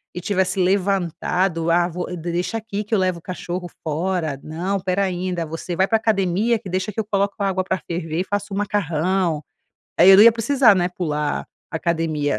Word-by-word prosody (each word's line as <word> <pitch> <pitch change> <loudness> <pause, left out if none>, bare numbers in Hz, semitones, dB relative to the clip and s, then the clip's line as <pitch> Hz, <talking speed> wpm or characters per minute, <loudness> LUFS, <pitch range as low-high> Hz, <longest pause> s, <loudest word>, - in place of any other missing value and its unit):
e - - -3
tivesse 190 0 0
levantado. 180 -2 0
Ah, 175 0 +3
vou 180 +1 -5
deixa 175 +6 -2
aqui 210 -2 -4
que 210 +2 -7
eu 200 - +2
levo 185 -2 0
o - - -21
cachorro 180 0 -5
fora, 160 -2 -2
não, 175 +6 -2
espera 190 +1 0
ai, 185 0 -2
da 170 -2 -2
você 165 +2 -5
vai 190 +2 +2
pra 225 - +3
academia 215 +1 +1
que 190 - -9
deixa 185 +3 -2
que 215 - -5
eu 215 - -1
coloco 200 -1 0
a 200 - +1
água 185 0 0
para 190 - -2
ferver 165 0 -2
e - - 0
faço 205 0 -3
o - - -2
macarrão. 180 -4 0 0.6
Aí 190 - +8
eu 190 - +9
não 205 - +9
ia 230 - +8
precisar, 230 -1 +4
né, 175 -1 +1
pular 150 -5 -2 0.2
academia." 160 -5 -1
185 Hz, 205 wpm, -21 LUFS, 170-200 Hz, 0.6 s, eu